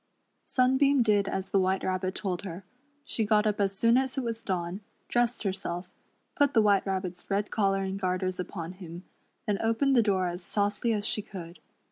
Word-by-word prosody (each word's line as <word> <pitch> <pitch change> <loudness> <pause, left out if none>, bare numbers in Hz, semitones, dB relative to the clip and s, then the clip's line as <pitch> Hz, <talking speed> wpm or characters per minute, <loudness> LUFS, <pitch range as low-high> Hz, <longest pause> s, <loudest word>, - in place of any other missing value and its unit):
Sunbeam 265 +1 +3
did 205 -3 +3
as 190 0 -3
the 195 - +4
White 190 0 +1
Rabbit 185 0 -1
told 185 -4 -2
her. 185 -1 -7 0.4
She 225 - 0
got 210 0 +3
up 210 -1 +1
as 195 -1 0
soon 230 +4 +4
as 265 +1 0
it 265 - 0
was 230 -1 -3
dawn, 180 0 -2 0.3
dressed 240 0 +1
herself, 185 -2 -3 0.4
put 285 -1 +2
the 225 - +7
White 200 -1 +3
Rabbit's 185 -2 -3
red 205 +1 0
collar 195 -2 +1
and 190 +1 -3
garters 185 -1 -1
upon 175 -2 -5
him, 180 -2 -9 0.4
then 205 -2 0
opened 230 +5 +2
the 240 - +6
door 195 -4 +1
as 175 +1 -4
softly 205 +5 0
as 210 -2 0
she 215 - 0
could. 180 -4 -9
200 Hz, 190 wpm, -29 LUFS, 185-225 Hz, 0.4 s, the